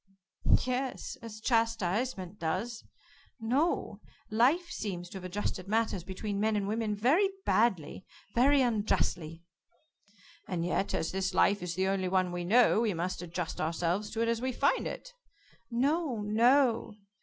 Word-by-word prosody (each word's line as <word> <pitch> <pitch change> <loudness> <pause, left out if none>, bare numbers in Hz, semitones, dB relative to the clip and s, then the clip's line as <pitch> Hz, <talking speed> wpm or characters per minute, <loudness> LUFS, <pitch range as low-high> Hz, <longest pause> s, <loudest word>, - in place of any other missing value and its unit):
"Yes, 255 +1 -3
as 220 -2 -9
chastisement 225 -3 0
does. 195 +9 -3 0.6
No, 260 +9 0 0.3
Life 270 +11 +3
seems 180 -4 -4
to 190 - -7
have - - -13
adjusted 185 0 -3
matters 215 -4 0
between 200 +2 -4
men 215 +1 +1
and 200 -1 -1
women 215 0 -1
very 290 - +3 0.2
badly, 190 -6 +1 0.3
very 270 +3 +4
unjustly." 175 -8 -1 1.0
"And 170 -2 -2
yet, 190 +2 0
as 160 - -1
this 190 -1 -2
life 200 0 +3
is 175 -2 -4
the 190 +1 +1
only 190 -1 0
one 185 -1 +1
we 175 0 -3
know 225 +4 +4
we 215 -5 0
must 180 +3 -3
adjust 175 -1 -4
ourselves 175 +5 -1
to 225 - -3
it - - 0
as 230 0 0
we 260 +1 -1
find 280 +3 +1
it." - - -7 0.6
"No, 270 0 0
no. 235 +1 +3
210 Hz, 145 wpm, -30 LUFS, 185-240 Hz, 1.0 s, very